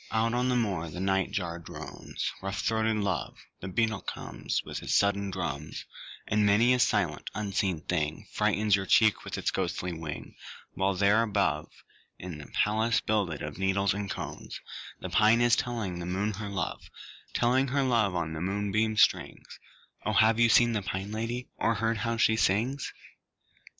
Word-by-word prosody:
Out 115 Hz, +1 st, +1 dB
on 125 Hz, +1 st, +1 dB
the 125 Hz, -, +2 dB
moor 95 Hz, -9 st, -1 dB
the 80 Hz, -, -7 dB
night 95 Hz, 0 st, +1 dB
jar 85 Hz, -3 st, -3 dB
drones 85 Hz, -, -6 dB
Rough 95 Hz, +1 st, -3 dB
throated 110 Hz, 0 st, +1 dB
love, 100 Hz, -2 st, -2 dB, 0.2 s
The 95 Hz, -, -6 dB
beetle 110 Hz, +2 st, 0 dB
comes -, -, -4 dB
With -, -, -5 dB
his -, -, -1 dB
sudden 100 Hz, 0 st, +2 dB
drums, 75 Hz, -6 st, -4 dB, 0.4 s
And 105 Hz, 0 st, +2 dB
many 105 Hz, +5 st, +5 dB
a 125 Hz, -, +1 dB
silent 95 Hz, -10 st, +1 dB
unseen 100 Hz, -5 st, -1 dB
thing 80 Hz, +3 st, -2 dB
Frightens 105 Hz, -1 st, +2 dB
your 95 Hz, -1 st, -3 dB
cheek 110 Hz, -2 st, +4 dB
with -, -, -5 dB
its -, -, 0 dB
ghostly 90 Hz, -1 st, -2 dB
wing; 80 Hz, -2 st, -6 dB, 0.4 s
While 95 Hz, 0 st, 0 dB
there 100 Hz, +4 st, +4 dB
above, 100 Hz, -9 st, 0 dB, 0.5 s
In 85 Hz, -4 st, -7 dB
a 75 Hz, -, -11 dB
palace 110 Hz, +2 st, +1 dB
builded 100 Hz, -8 st, -1 dB
of -, -, -6 dB
needles 95 Hz, 0 st, +2 dB
and 100 Hz, 0 st, -4 dB
cones, -, -, -6 dB, 0.4 s
The 95 Hz, -, -5 dB
pine 110 Hz, +4 st, +5 dB
is 120 Hz, -1 st, +5 dB
telling 110 Hz, -8 st, -2 dB
the 85 Hz, -, -5 dB
moon 100 Hz, +4 st, 0 dB
her 105 Hz, +1 st, -5 dB
love, 95 Hz, -3 st, -4 dB, 0.5 s
Telling 130 Hz, +3 st, +3 dB
her 140 Hz, +1 st, +1 dB
love 115 Hz, -7 st, +2 dB
on 85 Hz, -2 st, -2 dB
the 80 Hz, -, -5 dB
moonbeam 105 Hz, +3 st, 0 dB
strings -, -, +1 dB, 0.4 s
O 105 Hz, -, -1 dB
have 110 Hz, +2 st, +4 dB
you 115 Hz, 0 st, +5 dB
seen 120 Hz, +1 st, +5 dB
the 105 Hz, -, 0 dB
Pine 95 Hz, +1 st, -4 dB
Lady, 115 Hz, +3 st, -3 dB
Or 115 Hz, -, +1 dB
heard 115 Hz, +2 st, 0 dB
her -, -, -5 dB
how 115 Hz, 0 st, 0 dB
she 110 Hz, 0 st, +3 dB
sings? 115 Hz, +7 st, +1 dB
100 Hz, 175 wpm, -29 LUFS, 95-110 Hz, 0.5 s, many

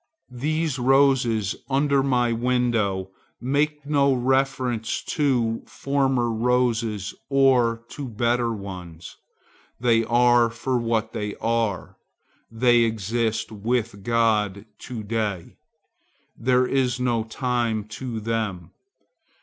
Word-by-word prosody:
These 150 Hz, +2 st, -1 dB
roses 125 Hz, -6 st, +3 dB
under 140 Hz, 0 st, +2 dB
my 125 Hz, -3 st, +1 dB
window 115 Hz, -6 st, 0 dB, 0.3 s
make 145 Hz, +3 st, -1 dB
no 140 Hz, -2 st, +3 dB
reference 130 Hz, -2 st, 0 dB
to 120 Hz, -6 st, 0 dB
former 135 Hz, -4 st, 0 dB
roses 115 Hz, -4 st, 0 dB, 0.2 s
or 125 Hz, -4 st, +3 dB
to 140 Hz, -2 st, -6 dB
better 120 Hz, +1 st, 0 dB
ones; 90 Hz, -6 st, -8 dB, 0.6 s
they 115 Hz, -2 st, +3 dB
are 120 Hz, 0 st, +4 dB
for 120 Hz, +2 st, -2 dB
what 115 Hz, -1 st, -1 dB
they 105 Hz, -1 st, -4 dB
are; 115 Hz, -5 st, -2 dB, 0.5 s
they 120 Hz, +1 st, +3 dB
exist 110 Hz, 0 st, -1 dB
with 110 Hz, 0 st, -2 dB
God 110 Hz, -3 st, +1 dB, 0.2 s
to 115 Hz, -4 st, -5 dB
day. 105 Hz, -5 st, -3 dB, 0.8 s
There 125 Hz, +1 st, +2 dB
is 130 Hz, -2 st, 0 dB
no 120 Hz, -3 st, 0 dB
time 115 Hz, -2 st, -1 dB
to 115 Hz, 0 st, -5 dB
them. 105 Hz, -6 st, -3 dB
120 Hz, 100 wpm, -24 LUFS, 110-130 Hz, 0.8 s, are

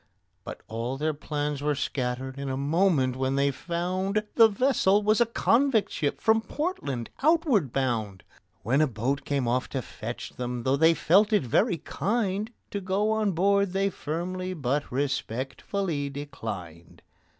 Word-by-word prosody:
But -, -, -8 dB
all 115 Hz, +4 st, -3 dB
their 155 Hz, +2 st, 0 dB
plans 145 Hz, -1 st, -3 dB
were 150 Hz, 0 st, +1 dB
scattered 130 Hz, 0 st, -3 dB
in 140 Hz, -1 st, -3 dB
a 130 Hz, -, -2 dB
moment 145 Hz, -3 st, +2 dB
when 130 Hz, +1 st, -1 dB
they 140 Hz, 0 st, +2 dB
found 185 Hz, +7 st, -2 dB
The 225 Hz, -1 st, +7 dB
vessel 210 Hz, -3 st, +2 dB
was 215 Hz, +3 st, +3 dB
a 235 Hz, -, +4 dB
convict 235 Hz, 0 st, +2 dB
ship 145 Hz, -3 st, -1 dB
from 220 Hz, 0 st, +3 dB
Portland, 220 Hz, -, -3 dB
outward 285 Hz, -, +3 dB
bound; 115 Hz, -8 st, -1 dB, 0.4 s
When 130 Hz, +8 st, +2 dB
a 155 Hz, -, +4 dB
boat 130 Hz, +4 st, -2 dB
came 140 Hz, -4 st, 0 dB
off 125 Hz, +2 st, 0 dB
to 135 Hz, -, -2 dB
fetch 115 Hz, +3 st, -7 dB
them, 125 Hz, -1 st, -3 dB
though 130 Hz, +2 st, +2 dB
they 160 Hz, +3 st, +5 dB
felt 200 Hz, +8 st, +4 dB
it 210 Hz, -7 st, +3 dB
very 175 Hz, -, +2 dB
kind, 205 Hz, +5 st, -1 dB, 0.2 s
To 200 Hz, -, -3 dB
go 195 Hz, +3 st, 0 dB
on 215 Hz, -3 st, +1 dB
board 200 Hz, +2 st, +2 dB
they 195 Hz, +1 st, +1 dB
firmly 185 Hz, +4 st, -4 dB
but 145 Hz, -1 st, -1 dB
respectfully 140 Hz, -, -2 dB
declined. 105 Hz, -, -7 dB
150 Hz, 155 wpm, -27 LUFS, 130-200 Hz, 0.4 s, The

